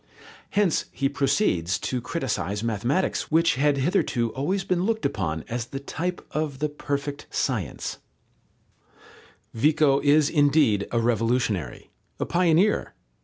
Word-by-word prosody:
Hence 200 -5 +1
he 135 - 0
proceeds 135 - +1
to 125 -1 -3
criticize 105 - -2
mathematics, 120 - -1
which, 165 +2 +3
had 145 +2 +2
hitherto 130 - +1
always 185 +9 -1
been 180 -2 0
looked 220 +3 -1
upon 80 -5 -2
as 120 0 -3
the 135 - -6
type 175 +6 -4
of 150 -3 -2
the 150 +2 -1
perfect 145 -1 -4
science. - - -2 1.5
Vico 145 +2 +3
is 145 +1 +4
indeed 145 - +3
a 115 - +1
revolutionary, 115 -4 -1 0.3
a - - 0
pioneer. 180 +3 +2
140 Hz, 120 wpm, -25 LUFS, 115-160 Hz, 1.5 s, is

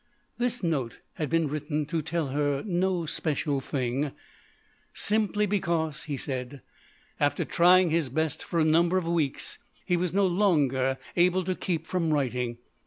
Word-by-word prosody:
This 245 -2 0
note 140 -9 -1 0.2
had 155 - -2
been 165 -1 +2
written 150 +1 -2
to 160 +2 -2
tell 160 -1 -2
her 145 0 0
no 180 -2 0
special 150 -2 -1
thing; 135 +1 -2 0.8
simply 210 0 +1
because, 170 -7 -1
he 145 -3 -3
said, 130 0 -5 0.6
after 145 0 +1
trying 180 0 +5
his 160 -4 +1
best 160 +2 -1
for 170 - -1
a - - +4
number 170 +3 +3
of 180 -3 -1
weeks, 165 -5 -1 0.3
he 180 - +2
was 175 -1 -1
not 195 0 +2
longer 140 -9 +2 0.2
able 180 +1 +3
to 185 +1 -1
keep 170 -3 -2
from 165 -2 0
writing. 125 -4 -1
160 Hz, 155 wpm, -27 LUFS, 140-180 Hz, 0.8 s, trying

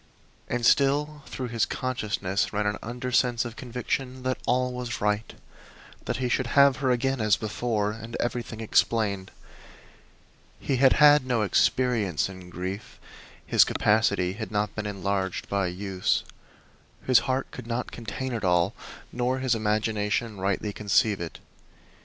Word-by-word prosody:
And 120 -1 -1
still 145 +3 +3
through 125 -2 -5
his 115 -1 0
consciousness 105 -6 -2
ran 105 0 -1
an 105 0 -1
undersense 125 0 0
of 120 -1 -6
conviction 125 +1 -4
that 130 0 -1
all 125 +1 +1
was 125 -2 -4
right 105 +1 0 0.7
that - - -2
he 130 -1 -1
should 125 +1 0
have 140 -2 +7
her 135 -2 0
again 130 +1 +1
as 105 -2 +3
before, 110 -1 -1
and 115 +1 -7
everything 120 -2 -3
explained. 105 -3 +1 1.3
He 135 - -1
had 135 +1 +6
had 150 -1 +6
no 125 -4 0
experience 105 - +1
in 95 -2 -11
grief; 95 +3 -6 0.5
his - - +5
capacity 100 -4 +2
had 110 +2 -6
not 105 0 -1
been 105 -1 -4
enlarged 100 -2 -2
by 100 -2 0
use. 95 +1 -1 0.8
His 130 -3 +6
heart 130 +1 -1
could 125 -2 -9
not 120 +1 -3
contain 120 +3 -5
it 110 -3 -3
all, 90 +1 +2 0.4
nor 125 +2 0
his 130 -2 +1
imagination 105 0 -1
rightly 100 +2 -1
conceive 105 -1 +1
it. 85 - -6
115 Hz, 145 wpm, -26 LUFS, 100-125 Hz, 1.3 s, have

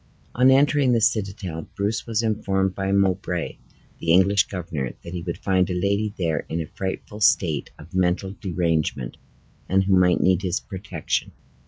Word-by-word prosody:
On 125 +2 +5
entering 135 -1 +4
the 115 - +3
citadel, 100 -6 -1
Bruce 105 +3 -2
was 115 0 0
informed 95 -3 0
by 95 0 -2
Mowbray, 100 -2 0 0.4
the 85 - 0
English 100 +3 +4
governor, 80 -9 -4
that 85 - -8
he 90 - -4
would 85 0 -4
find 95 -1 +1
a 90 - -1
lady 100 +3 0
there 80 -5 0
in 80 - -2
a 80 - -2
frightful 95 +5 -5
state 90 -8 +2
of - - -14
mental 95 +1 +1
derangement, 80 - -1 0.5
and 95 +1 +3
who 95 0 +3
might 90 -1 +4
need 95 -1 +3
his 90 -3 -1
protection. 95 -5 -4
95 Hz, 165 wpm, -23 LUFS, 85-100 Hz, 0.5 s, On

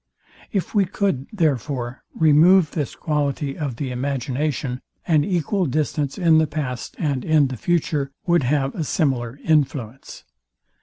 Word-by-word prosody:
If 195 -3 -2
we 205 -3 +3
could, 185 -8 -1
therefore, 140 - -1
remove 160 +2 +5
this 145 -6 -3
quality 145 -2 -1
of 140 -6 -3
the 130 +1 -4
imagination, 130 0 -2 0.2
an 155 -4 +3
equal 180 +1 0
distance 145 0 -1
in 165 -4 +5
the 160 - +2
past 135 -5 -4
and 140 -6 -1
in 155 -4 +3
the 130 - -4
future, 150 0 0 0.2
would 175 -2 +3
have 135 +1 0
a 165 - -3
similar 130 -4 -1
influence. 135 -5 -1
145 Hz, 140 wpm, -22 LUFS, 135-160 Hz, 0.2 s, remove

